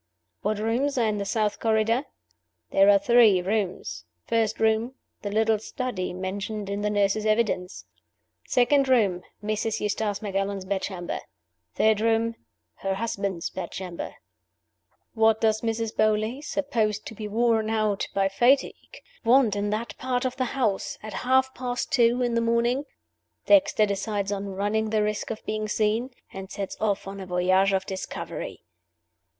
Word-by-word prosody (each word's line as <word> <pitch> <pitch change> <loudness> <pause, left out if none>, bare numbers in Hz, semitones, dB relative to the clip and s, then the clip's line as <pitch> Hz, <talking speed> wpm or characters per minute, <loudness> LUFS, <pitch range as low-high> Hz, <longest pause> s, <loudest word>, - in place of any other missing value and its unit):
What 210 +1 0
rooms 240 +6 0
are 235 - +3
in 210 -1 0
the 200 - -2
South 210 0 0
Corridor? 225 +4 +2 0.7
There 195 +1 +5
are 200 - +7
three 220 -2 +5
rooms. 185 - -2 0.2
First 225 -2 0
room, 220 +3 +1 0.3
the 205 - -3
little 220 +1 +2
study, 225 -4 -4
mentioned 195 +3 -4
in 200 +1 -2
the 210 - 0
nurse's 205 +1 +1
evidence. 215 -4 0 0.6
Second 265 +2 +3
room, 205 -8 +3 0.2
Mrs. 215 +1 -1
Eustace 210 0 -1
Macallan's 195 -1 -2
bedchamber. 190 -2 -3 0.6
Third 220 -1 +3
room, 230 0 +2 0.4
her 195 0 -2
husband's 195 -5 -3
bedchamber. 180 -1 -6 1.0
What 220 -1 +3
does 220 -1 +2
Mrs. 225 -1 -2
Beauly 215 +4 +1
(supposed 225 -8 -1
to - - -7
be 215 -1 -6
worn 225 0 +2
out 215 -2 0
by 195 -1 +3
fatigue) 250 - +1 0.2
want 235 -3 +4
in 205 0 -1
that 215 +3 -3
part 255 0 -1
of 255 0 -1
the 260 -1 0
house 215 -7 0
at 215 - -7
half 260 +1 +2
past 245 -1 -3
two 240 0 +3
in 240 -1 0
the 230 - +2
morning? 235 +4 +1 0.6
Dexter 290 -7 +5
decides 200 0 -2
on 200 0 -3
running 205 +3 -1
the 215 -1 +2
risk 210 0 -2
of 220 - -6
being 215 0 -2
seen 215 +4 0 0.2
and 190 0 -7
sets 200 -1 -5
off 205 -2 0
on 195 0 -6
a 190 - -7
voyage 185 +2 +3
of 190 -1 0
discovery. 190 -1 -6
215 Hz, 150 wpm, -26 LUFS, 200-230 Hz, 1.0 s, are